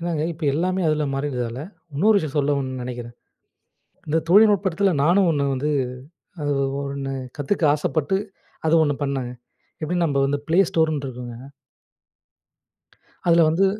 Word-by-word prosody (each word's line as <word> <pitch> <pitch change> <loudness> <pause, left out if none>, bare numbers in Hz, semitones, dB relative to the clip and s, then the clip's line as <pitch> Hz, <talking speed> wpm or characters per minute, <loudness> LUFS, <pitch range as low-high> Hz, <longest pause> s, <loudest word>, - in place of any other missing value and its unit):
என்னாங்க 165 -2 -1
இப்ப 160 0 -15
எல்லாமே 185 +3 0
அதுல 155 -1 +1
மாறியர்றதால, 125 -3 -3 0.3
இன்னொரு 205 +8 +4
விஷயம் 155 -3 -4
சொல்லணும்னு 140 -3 0
நெனைக்கிறேன். 120 -1 -6 0.9
இந்த 160 +2 +2
தொழில்நுட்பத்துல 200 -3 +4
நானும் 180 +2 +4
ஒண்ணு 140 -2 0
வந்து, 145 +4 -1 0.7
அது 145 0 0 0.3
ஒண்ணு 140 -1 -4 0.2
கத்துக்க 160 +4 0
ஆசைப்பட்டு 155 +4 0 0.5
அது 165 - +5
ஒண்ணு 145 -2 0
பண்ணேங்க. 130 -3 -2 0.5
எப்படி 175 +3 -1
நம்ப 140 -2 0
வந்து 145 +1 -1
ப்ளே 170 +4 +4
ஸ்டோர்ன்னு 155 -3 +1
இருக்கும்ங்க. 125 0 -8 1.8
அதுல 170 -1 +6
வந்து 175 +5 +3
150 Hz, 125 wpm, -23 LUFS, 135-170 Hz, 1.8 s, அதுல